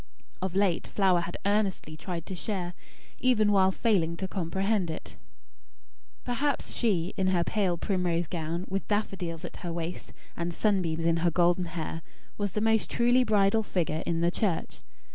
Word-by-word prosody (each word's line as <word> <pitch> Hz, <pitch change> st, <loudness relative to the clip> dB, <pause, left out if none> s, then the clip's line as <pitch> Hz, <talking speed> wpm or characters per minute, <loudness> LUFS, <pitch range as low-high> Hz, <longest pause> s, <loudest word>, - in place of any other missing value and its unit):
Of 190 Hz, -1 st, -2 dB
late, 195 Hz, -4 st, +2 dB
Flower 190 Hz, -3 st, +3 dB
had 170 Hz, +1 st, -5 dB
earnestly 200 Hz, -6 st, 0 dB
tried 170 Hz, +1 st, -5 dB
to -, -, -6 dB
share, 180 Hz, -1 st, -3 dB, 0.5 s
even 220 Hz, -5 st, +3 dB
while 190 Hz, -1 st, +5 dB
failing 180 Hz, -6 st, +1 dB
to 190 Hz, -, -3 dB
comprehend, 190 Hz, +1 st, 0 dB
it. 160 Hz, -, -7 dB, 1.1 s
Perhaps 270 Hz, +4 st, -1 dB
she, 185 Hz, -7 st, +1 dB
in 190 Hz, -, +1 dB
her 180 Hz, -2 st, +3 dB
pale 190 Hz, -3 st, 0 dB
primrose 175 Hz, -2 st, 0 dB
gown, 170 Hz, +1 st, -3 dB
with 195 Hz, +1 st, -3 dB
daffodils 195 Hz, -6 st, -2 dB
at -, -, -8 dB
her 175 Hz, -, -5 dB
waist, 170 Hz, +1 st, -5 dB, 0.2 s
and 170 Hz, 0 st, -3 dB
sunbeams 175 Hz, -6 st, +1 dB
in 165 Hz, 0 st, +3 dB
her 170 Hz, +1 st, +2 dB
golden 175 Hz, +1 st, +3 dB
hair, 165 Hz, -1 st, -4 dB, 0.3 s
was 205 Hz, -2 st, -2 dB
the 210 Hz, -, -1 dB
most 220 Hz, 0 st, +2 dB
truly 245 Hz, +2 st, +4 dB
bridal 210 Hz, -1 st, +3 dB
figure 165 Hz, -6 st, -1 dB
in 165 Hz, -1 st, 0 dB
the 170 Hz, +1 st, +3 dB
church. 190 Hz, -4 st, -1 dB
185 Hz, 160 wpm, -28 LUFS, 170-205 Hz, 1.1 s, while